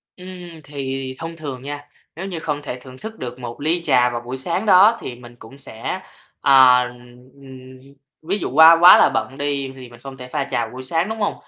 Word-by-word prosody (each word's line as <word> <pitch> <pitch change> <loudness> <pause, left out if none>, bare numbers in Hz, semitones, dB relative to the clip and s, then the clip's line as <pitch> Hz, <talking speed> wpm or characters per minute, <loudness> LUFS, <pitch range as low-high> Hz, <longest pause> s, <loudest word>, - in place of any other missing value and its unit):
Ừm, 180 0 -13 0.4
thì 135 -2 -5
thông 165 0 -7
thường 140 -5 -7
nha, 145 +1 -7 0.3
nếu 175 - -6
như 180 -4 -5
không 150 -2 -4
thể 130 -3 -7
thưởng 130 -1 -13
thức 220 +8 -9
được 125 0 -7
một 120 +2 -8
ly 165 +3 0
trà 125 -5 +3
vào 120 0 -5
buổi 125 +2 -7
sáng 170 +10 0
đó 205 +4 +6
thì 125 - -7
mình 120 0 -15
cũng 120 +4 -15
sẽ 115 -5 -4 0.4
ờ, 130 -3 +6
ừm, 130 +2 -15 0.4
ví 185 +6 -2
dụ - - -4
qua 160 +3 +8
quá 180 - +9
là - - +5
bận 135 - -3
đi 140 -2 -3
thì 130 -2 -12
mình 120 -1 -16
không 135 +1 -11
thể 125 - -9
pha 140 +2 -2
trà 120 -4 -2
vào - - -11
buổi 130 - -8
sáng, 165 +9 -1
đúng 220 - -5
hông? 205 - -1
135 Hz, 225 wpm, -20 LUFS, 125-160 Hz, 0.4 s, quá